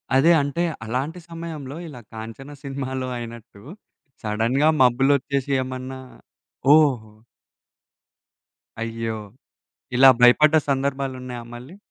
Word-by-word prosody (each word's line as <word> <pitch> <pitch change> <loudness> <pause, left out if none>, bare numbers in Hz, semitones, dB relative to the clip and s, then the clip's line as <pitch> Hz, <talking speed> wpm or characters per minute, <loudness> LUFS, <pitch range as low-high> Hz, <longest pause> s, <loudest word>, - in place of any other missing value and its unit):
అదే 155 +6 +5
అంటే 145 +5 -1 0.2
అలాంటి 135 +10 -3
సమయంలో 160 -4 -7
ఇలా 125 -6 -10
కాంచన 115 +6 -9
సినిమాలో 130 -1 -4
అయినట్టు 115 -3 -10 0.6
సడెన్‍గా 115 +8 +1
మబ్బులు 130 +3 +4
ఒచ్చేసి 140 +1 -3
ఏమన్నా 130 0 -6 0.7
ఓహో! 130 -9 +3 1.7
అయ్యో! 115 -1 -3 0.8
ఇలా 135 +1 +8
భయపడ్డ 150 +6 +6
సందర్భాలు 135 -1 -1
ఉన్నాయా 125 -2 -7
మళ్ళీ? 130 +9 -10
130 Hz, 95 wpm, -23 LUFS, 120-140 Hz, 1.7 s, ఇలా